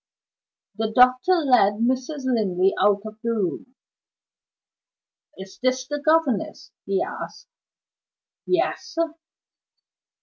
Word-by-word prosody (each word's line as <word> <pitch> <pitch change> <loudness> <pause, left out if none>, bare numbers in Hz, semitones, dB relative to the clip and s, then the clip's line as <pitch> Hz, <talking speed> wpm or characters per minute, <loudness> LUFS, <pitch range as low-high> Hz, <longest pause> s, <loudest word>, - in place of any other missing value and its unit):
The 220 0 -2
doctor 255 +8 +5
led 250 - +3
Mrs. 260 +6 -2
Linley 195 -7 +1
out 205 -1 +3
of 215 0 -9
the 235 - -2
room. 220 +5 -3 1.6
"Is 190 0 -11
this 255 0 0
the 290 +1 -3
governess?" 310 -8 0 0.2
he 195 -1 0
asked. - - -8 1.0
"Yes!" 350 -1 -1
250 Hz, 95 wpm, -23 LUFS, 205-270 Hz, 1.6 s, doctor